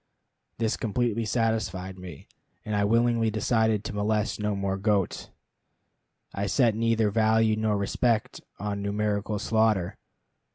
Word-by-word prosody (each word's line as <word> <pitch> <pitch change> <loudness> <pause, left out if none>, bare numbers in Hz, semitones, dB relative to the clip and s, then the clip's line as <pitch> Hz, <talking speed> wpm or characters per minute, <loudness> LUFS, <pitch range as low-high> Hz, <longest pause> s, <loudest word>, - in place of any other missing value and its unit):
This 110 -1 0
completely 115 0 -1
satisfied 110 -5 -1
me, 90 -6 -10 0.4
and 105 - -2
I 100 0 +2
willingly 115 +1 +2
decided 110 0 +1
to - - -5
molest 105 +1 -1
no 105 -1 -1
more 100 -1 -1
goats. 100 -1 -1 1.0
I 100 0 -2
set 115 +3 +3
neither 115 -1 +1
value 110 0 +3
nor 110 -1 0
respect 110 +3 0 0.2
on 100 0 -3
numerical 105 +1 -1
slaughter. 110 -3 +1
105 Hz, 125 wpm, -27 LUFS, 100-115 Hz, 1.0 s, set